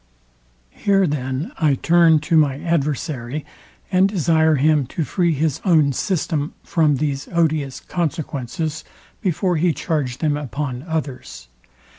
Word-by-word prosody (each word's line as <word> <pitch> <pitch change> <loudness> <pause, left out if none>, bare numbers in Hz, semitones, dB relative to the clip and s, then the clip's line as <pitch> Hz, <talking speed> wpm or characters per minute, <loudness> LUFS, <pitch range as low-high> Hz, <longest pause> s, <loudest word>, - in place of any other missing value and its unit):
Here 195 - +2
then 145 - -3
I 150 -4 +3
turn 165 +2 +4
to 165 +2 0
my 145 -4 +3
adversary, 150 -4 -2 0.5
and 190 +1 +4
desire 160 -4 +3
him 150 -1 +2
to 160 - -3
free 170 +5 +1
his 150 -1 -1
own 155 -7 +3
system 155 -3 -2
from 155 -6 +2
these 140 0 -2
odious 155 -5 0
consequences 155 -2 -3 0.4
before 180 -3 0
he 170 +1 +2
charge 145 -8 -2
them 150 -3 0
upon 140 -3 -4
others. 130 - -5
155 Hz, 125 wpm, -21 LUFS, 140-170 Hz, 0.5 s, turn